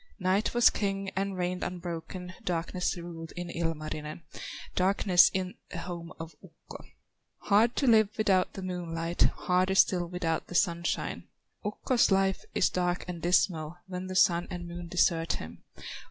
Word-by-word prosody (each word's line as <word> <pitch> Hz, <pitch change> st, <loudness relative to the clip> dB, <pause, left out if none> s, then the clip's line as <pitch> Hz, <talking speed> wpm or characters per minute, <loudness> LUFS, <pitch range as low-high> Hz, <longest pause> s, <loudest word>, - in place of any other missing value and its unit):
Night 190 Hz, +4 st, +1 dB
was 240 Hz, -, +6 dB
king 195 Hz, -1 st, -2 dB
and 195 Hz, 0 st, -1 dB
reigned 180 Hz, 0 st, -2 dB
unbroken, 180 Hz, +1 st, -5 dB
Darkness 180 Hz, +1 st, -1 dB
ruled 170 Hz, -1 st, -8 dB
in 175 Hz, -1 st, -5 dB
Kalevala, 155 Hz, -2 st, -4 dB, 0.5 s
Darkness 185 Hz, -1 st, +5 dB
in 185 Hz, -1 st, -2 dB, 0.2 s
the -, -, -6 dB
home 170 Hz, -1 st, -6 dB
of 165 Hz, 0 st, -8 dB
Ukko. -, -, -13 dB, 0.6 s
Hard 220 Hz, +4 st, +3 dB
to 280 Hz, -, +1 dB
live 220 Hz, -4 st, +5 dB
without 195 Hz, -4 st, +2 dB
the 195 Hz, -, -7 dB
moonlight, 170 Hz, -2 st, -3 dB
Harder 185 Hz, +1 st, +2 dB
still 180 Hz, -2 st, +4 dB
without 170 Hz, -2 st, -2 dB
the 175 Hz, -, -8 dB
sunshine; 170 Hz, -2 st, 0 dB, 0.4 s
Ukko's 230 Hz, +4 st, +1 dB
life 195 Hz, -1 st, +2 dB
is -, -, +4 dB
dark 180 Hz, -1 st, -1 dB
and 175 Hz, -2 st, -6 dB
dismal, 170 Hz, -2 st, +1 dB
When 185 Hz, 0 st, -5 dB
the 185 Hz, -, -5 dB
Sun 175 Hz, -1 st, +4 dB
and 175 Hz, -1 st, -6 dB
Moon 175 Hz, 0 st, -7 dB
desert 165 Hz, -1 st, +2 dB
him. 80 Hz, +2 st, -8 dB
180 Hz, 150 wpm, -29 LUFS, 170-190 Hz, 0.6 s, was